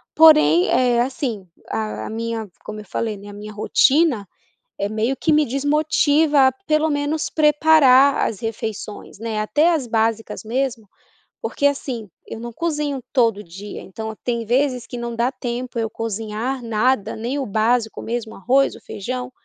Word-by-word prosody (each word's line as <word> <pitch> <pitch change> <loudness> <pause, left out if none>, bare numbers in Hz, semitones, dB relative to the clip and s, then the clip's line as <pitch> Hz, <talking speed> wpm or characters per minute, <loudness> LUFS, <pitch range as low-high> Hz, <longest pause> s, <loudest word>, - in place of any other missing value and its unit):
Porém, 300 - +6
eh, 245 -1 +3
assim 245 -6 -3 0.2
a 215 -1 -3
minha 225 -1 -4
como 215 0 -7
eu - - -13
falei, 215 0 -3
né, 205 +1 -11
a 205 - -9
minha 210 +1 -9
rotina, 260 - +3 0.5
é 200 - -1
meio 220 +5 -1
que 315 - +1
me 305 0 +4
desmotiva 290 +1 +3
a - - -1
pelo 310 0 +2
menos 290 +2 -1
preparar 295 -3 +5
as 210 - -4
refeições, 220 -3 -6
né, 225 -1 -3
até 295 +11 +3
as 295 -7 -1
básicas 225 -1 -1
mesmo, 235 -1 -2 0.5
porque 285 - -2
assim, 250 -7 -3 0.2
eu 225 - -8
não 235 +1 -6
cozinho 295 -3 -2
todo 225 -5 +2
dia, 195 +4 -9
então 220 +3 -7
tem 235 -2 -2
vezes 250 0 +1
que 245 - -7
não 235 -1 -4
dá 240 +3 +1
tempo, 250 -1 -5
eu 225 -1 -1
cozinhar 225 +4 -4
nada, 225 -1 +1
nem 240 +6 -3
o 270 - -2
básico 220 +2 0
mesmo, 230 -1 -4
o - - -11
arroz, 265 +7 +2
o - - -14
feijão, 250 +5 -5
235 Hz, 165 wpm, -21 LUFS, 220-275 Hz, 0.5 s, Porém